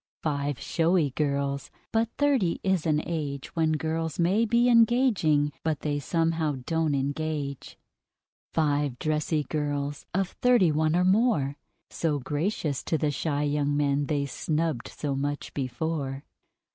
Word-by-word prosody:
Five 145 -2 -1
showy 165 -3 +1
girls 140 -1 -1 0.2
but 225 0 +1
Thirty 270 -12 +2
is 190 -4 +1
an 150 -1 +2
age 145 -5 -4
When 160 -1 +2
girls 160 +1 -2
may 190 +7 +3
be 235 +2 +3
engaging, 225 - +4
but 155 -3 -1
they 145 -1 -1
somehow 160 +1 0
don't 160 -2 +1
engage. 140 0 -3 0.7
Five 145 -4 +1
dressy 155 +1 0
girls, 145 -1 -3
of 190 0 0
Thirty 245 -9 +5
one 155 +1 +1
or 180 +1 +3
more: 185 - +2 0.4
So 155 -3 0
gracious 145 - -2
to 160 - +1
the 150 -1 0
shy 145 0 -1
young 145 0 0
men 145 -1 +1
they 145 -2 0
snubbed 155 -2 -2
so 145 -2 -3
much 145 +1 -3
before! 135 +1 -3
155 Hz, 135 wpm, -27 LUFS, 145-165 Hz, 0.7 s, Thirty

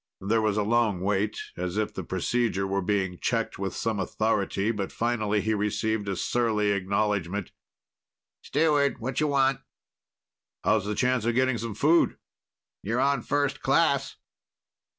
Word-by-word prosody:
There 110 +4 +1
was 105 -1 +1
a 105 - +2
long 110 -4 +1
wait, 100 +2 0 0.2
as 90 +2 -3
if 110 -1 -1
the - - -5
procedure 115 -5 0
were 100 0 -1
being 95 -2 -1
checked 115 -4 -1
with 95 0 -3
some 110 -3 -1
authority, 105 +1 0
but 100 -4 -4
finally 110 -3 0
he 110 +2 0
received 105 0 -1
a 95 - -1
surly 110 0 +1
acknowledgement. 100 -1 -1 0.9
"Steward. 145 -2 +2
Whatcha 135 +5 -1
want?" 135 -2 +2 1.0
"How's - - +2
the 105 - -1
chance 125 0 +1
of 120 0 +1
getting 130 -2 +2
some 115 -2 -4
food?" 160 +8 +3 0.6
"You're 115 +5 -1
on 140 -1 +2
first 145 +3 -1
class." - - +2
110 Hz, 145 wpm, -27 LUFS, 100-120 Hz, 1.0 s, food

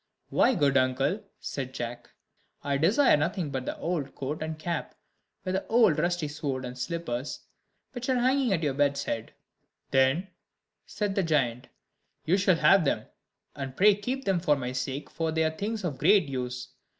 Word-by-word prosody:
"Why, 260 - +3
good 140 -6 +3
uncle," 130 +9 +1 0.2
said 130 -1 -5
Jack, 120 0 -5 0.5
"I 140 -1 0
desire 220 - +5
nothing 160 +1 -1
but 130 -2 -4
the - - -3
old 160 -6 -3
coat 145 +3 -4
and 155 0 -3
cap, 165 +1 -4 0.5
with 185 - -1
the 190 - -2
old 225 -10 +4
rusty 175 -1 0
sword 145 -3 -3
and 125 0 -6
slippers, 130 -2 -4 0.5
which 250 0 -5
are 260 - +3
hanging 255 0 +2
at 170 -4 +1
your 145 -3 +1
bed's 140 0 +1
head." 115 - -4 0.6
"Then," 135 +8 +3 0.6
said 205 -2 -2
the 195 - +1
giant, 130 -7 0 0.6
"you 170 - +3
shall 190 -2 +3
have 165 +4 +5
them: 140 - 0 0.5
and 135 -2 -6
pray 205 +2 +7
keep 250 +7 -4
them 190 -3 +2
for 150 -4 +3
my 125 -2 -4
sake, 130 +2 -3
for 165 -1 -2
they 160 0 +1
are 160 0 0
things 215 +3 -3
of 145 -7 -3
great 205 -3 +5
use. 125 -2 -4
155 Hz, 175 wpm, -28 LUFS, 135-190 Hz, 0.6 s, pray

